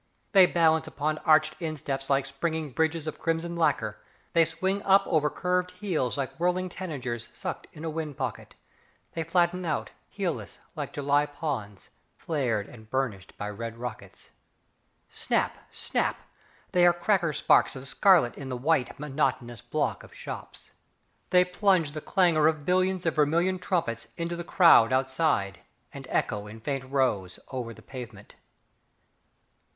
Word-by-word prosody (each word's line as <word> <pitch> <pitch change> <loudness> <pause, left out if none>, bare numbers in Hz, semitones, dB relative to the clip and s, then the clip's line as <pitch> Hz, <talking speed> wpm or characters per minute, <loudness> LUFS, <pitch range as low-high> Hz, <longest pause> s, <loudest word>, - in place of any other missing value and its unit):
They 190 -3 +7
balance 160 -2 +3
upon 155 +1 -2
arched 155 -1 +4
insteps 145 -4 -3
like 135 -1 +2
springing 155 +2 -3
bridges 160 +3 0
of 155 - -5
crimson 165 +1 -1
lacquer; 165 -1 0 0.3
they 165 -1 +5
swing 190 +5 -1
up 195 0 +5
over 155 -3 +2
curved 180 +3 0
heels 175 - -1
like 135 -2 -2
whirling 180 +1 +1
tanagers 135 -11 -5
sucked - - -5
in 155 - -9
a - - -1
wind 155 -3 -4
pocket; - - -5 0.6
they 165 - -2
flatten 175 +2 +1
out, 155 -4 -2 0.2
heelless, - - -4 0.2
like - - -4
July 145 +1 +1
ponds, 140 -10 -5 0.3
flared 125 -10 -1
and 110 -3 -14
burnished 115 -8 -3
by 105 - -4
red 115 +2 -6
rockets. 125 +1 -8 0.8
Snap, - - -1
snap, - - -1 0.5
they 180 - +4
are 175 - +6
cracker 175 -1 +1
sparks 145 - +3
of 130 +1 -7
scarlet 175 - +4
in 135 -2 -7
the 125 - -3
white, 140 0 0
monotonous 135 -5 -1
block - - -1
of - - -15
shops. - - -9 0.6
They 180 0 +5
plunge 180 -4 +2
the 155 +1 -6
clangour 170 -5 +3
of 155 -2 0
billions 185 0 +1
of 165 - +2
vermilion 170 +5 +2
trumpets 165 - -1
into 170 0 -2
the 170 - -5
crowd 165 -10 +6
outside, 130 - +1 0.3
and - - -9
echo 105 0 -1
in 110 +2 -10
faint 135 +3 -3
rose 125 -9 0
over 125 -3 -4
the 110 0 -13
pavement. 120 -6 -10
155 Hz, 150 wpm, -27 LUFS, 130-170 Hz, 0.8 s, They